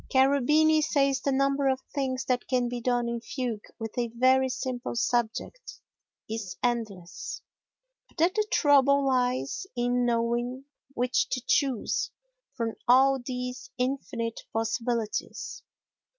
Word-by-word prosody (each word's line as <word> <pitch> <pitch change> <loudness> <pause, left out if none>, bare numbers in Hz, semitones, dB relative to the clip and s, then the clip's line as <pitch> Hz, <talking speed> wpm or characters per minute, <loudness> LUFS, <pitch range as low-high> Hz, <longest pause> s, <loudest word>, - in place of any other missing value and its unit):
Cherubini 285 +4 +4
says 275 -2 +2
the 280 - 0
number 275 +1 +2
of 265 -1 +2
things 260 -2 -1
that 250 -1 0
can 250 -2 +1
be 240 0 -4
done 245 0 +1
in 235 0 -3
fugue 240 -4 -4
with 225 -1 -6
a 240 -1 0
very 260 +1 +4
simple 255 -1 -4
subject 240 - -2 0.5
is 215 -5 -5
endless, 215 -8 -3 0.6
but - - -28
that 340 +3 +3
the 425 0 0
trouble 280 -1 +4
lies 255 - 0
in 245 0 +1
knowing 240 +2 0 0.3
which 250 - +1
to - - -2
choose 280 - +1 0.5
from 230 -1 -2
all 265 +2 +5
these 250 0 -5
infinite 250 -3 -2
possibilities. 225 0 -2
250 Hz, 125 wpm, -28 LUFS, 235-275 Hz, 0.6 s, all